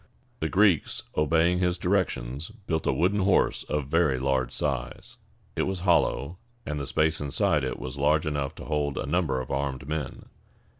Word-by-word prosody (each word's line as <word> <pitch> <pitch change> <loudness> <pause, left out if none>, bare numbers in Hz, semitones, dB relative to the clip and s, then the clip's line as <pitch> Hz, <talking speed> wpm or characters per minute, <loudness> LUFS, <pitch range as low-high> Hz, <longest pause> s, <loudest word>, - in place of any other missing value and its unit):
The 80 - -1
Greeks, 95 -4 +3
obeying 80 +3 +3
his 90 -1 +1
directions, 85 - -1
built 100 -8 -4
a - - +4
wooden 90 +9 +1
horse 95 0 +2
of 75 -2 -2
very 75 -2 +2
large 65 -1 0
size. - - -3 0.4
It - - 0
was 95 -2 -3
hollow, 85 -2 +1 0.3
and 75 -1 -3
the 70 - -4
space 80 0 +1
inside 70 -2 +1
it - - -2
was 65 +2 -6
large 75 +2 +3
enough 70 -2 -2
to - - -9
hold 75 -2 -1
a - - -2
number 75 -4 0
of 65 - -6
armed 70 0 -2
men. 75 -2 -4
75 Hz, 170 wpm, -27 LUFS, 70-90 Hz, 0.4 s, a